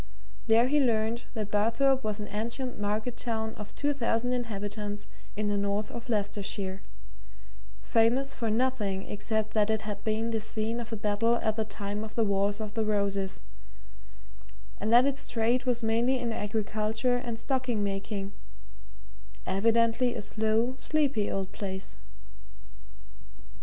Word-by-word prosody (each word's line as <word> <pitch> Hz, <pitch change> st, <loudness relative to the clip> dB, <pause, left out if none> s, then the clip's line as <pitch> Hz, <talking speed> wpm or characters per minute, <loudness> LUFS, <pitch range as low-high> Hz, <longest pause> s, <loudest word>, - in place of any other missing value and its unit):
There 230 Hz, +2 st, +5 dB
he 295 Hz, +3 st, +3 dB
learnt 230 Hz, -2 st, +1 dB
that 210 Hz, -2 st, -3 dB
Barthorpe 240 Hz, +6 st, +3 dB
was 215 Hz, 0 st, -2 dB
an 210 Hz, -, -4 dB
ancient 235 Hz, +4 st, -3 dB
market 215 Hz, +4 st, -1 dB
town 220 Hz, -2 st, -2 dB
of 210 Hz, -1 st, -9 dB
two 290 Hz, 0 st, +1 dB
thousand 245 Hz, -2 st, +1 dB
inhabitants 205 Hz, -3 st, -3 dB, 0.3 s
in 215 Hz, 0 st, -1 dB
the 205 Hz, 0 st, +1 dB
north 200 Hz, +1 st, -1 dB
of 235 Hz, +2 st, -7 dB
Leicestershire, 200 Hz, -2 st, -1 dB, 1.0 s
famous 245 Hz, +5 st, +3 dB
for 230 Hz, -3 st, -2 dB
nothing 215 Hz, -5 st, +1 dB
except 215 Hz, +1 st, -1 dB
that 215 Hz, -1 st, +3 dB
it 220 Hz, -1 st, +1 dB
had 210 Hz, -1 st, -5 dB
been 220 Hz, +1 st, 0 dB
the 225 Hz, -, 0 dB
scene 220 Hz, +2 st, -1 dB
of 235 Hz, -1 st, -6 dB
a -, -, -1 dB
battle 210 Hz, +2 st, +2 dB
at 220 Hz, -2 st, 0 dB
the 220 Hz, -, +1 dB
time 205 Hz, 0 st, -4 dB
of 220 Hz, 0 st, -8 dB
the 230 Hz, -, +3 dB
Wars 200 Hz, 0 st, +1 dB
of 215 Hz, -1 st, -5 dB
the 225 Hz, -, 0 dB
Roses, 200 Hz, -2 st, 0 dB, 1.4 s
and 215 Hz, +2 st, -1 dB
that 240 Hz, +2 st, +8 dB
its 280 Hz, 0 st, +1 dB
trade 235 Hz, +3 st, +1 dB
was 245 Hz, -2 st, +1 dB
mainly 235 Hz, +4 st, +3 dB
in 240 Hz, -2 st, -2 dB
agriculture 215 Hz, +3 st, 0 dB
and 240 Hz, -2 st, -4 dB
stocking 245 Hz, -3 st, 0 dB
making 195 Hz, 0 st, -3 dB, 1.1 s
evidently 230 Hz, +4 st, +3 dB
a 225 Hz, -, -3 dB
slow, 220 Hz, +4 st, +1 dB
sleepy 280 Hz, -10 st, +1 dB
old 195 Hz, -1 st, -2 dB
place. 190 Hz, -1 st, -4 dB
220 Hz, 145 wpm, -29 LUFS, 205-235 Hz, 1.4 s, that